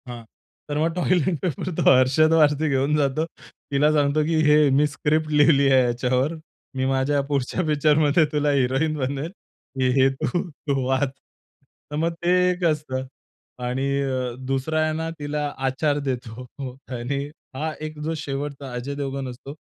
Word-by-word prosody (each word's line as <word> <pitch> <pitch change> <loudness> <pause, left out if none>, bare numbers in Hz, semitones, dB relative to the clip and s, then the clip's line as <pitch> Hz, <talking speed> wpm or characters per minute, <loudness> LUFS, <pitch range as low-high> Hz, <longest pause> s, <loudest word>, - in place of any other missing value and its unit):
हां. 120 -1 -8 0.5
तर 145 - -2
मग 165 +2 +1
टॉयलेट 180 -2 +1
पेपर 180 +1 -2
तो - - 0
अर्शद 135 +5 +4
वारसी 155 -1 +3
घेऊन 140 +2 +1
जातो. 145 +2 +1 0.5
तिला 145 +2 +3
सांगतो, 150 0 +2
की 165 +1 0
"हे, 150 -1 +5
मी 140 +3 +3
स्क्रिप्ट 155 +2 -1
लिहिली 140 -2 +5
आहे 130 -1 +5
याच्यावर. 125 +4 0 0.4
मी 130 0 0
माझ्या 135 +2 +1
पुढच्या 140 +4 -1
पिक्चरमध्ये 150 +1 +3
तुला 150 -1 +1
हिरोईन 135 +3 +1
बनवेल, 140 +3 -2
की 130 -9 -5
हे 135 0 +5
तू, 175 +6 -1
तू 140 -3 -3
वाच." 130 +1 +1 0.8
तर - - -3
मग 165 +2 0
ते 175 - +1 0.2
एक 180 0 -2
असतं. 150 -5 -1 0.6
आणि 125 +2 -1 0.2
अ, 130 -3 -2
दुसरा 135 +4 -1
आहे 155 0 +1
ना 160 0 -3
तिला 150 0 -2 0.2
आचार 145 +2 0
देतो. 125 -1 -5
हो, 130 -2 -5 0.2
आणि 140 +4 -2 0.3
हा 155 +3 -2
एक 155 -1 -10
जो 160 +1 -1
शेवटचा 140 -2 -5
अजय 125 +4 -4
देवगन 135 -1 -4
असतो 135 +3 -9
140 Hz, 160 wpm, -23 LUFS, 130-155 Hz, 0.8 s, हे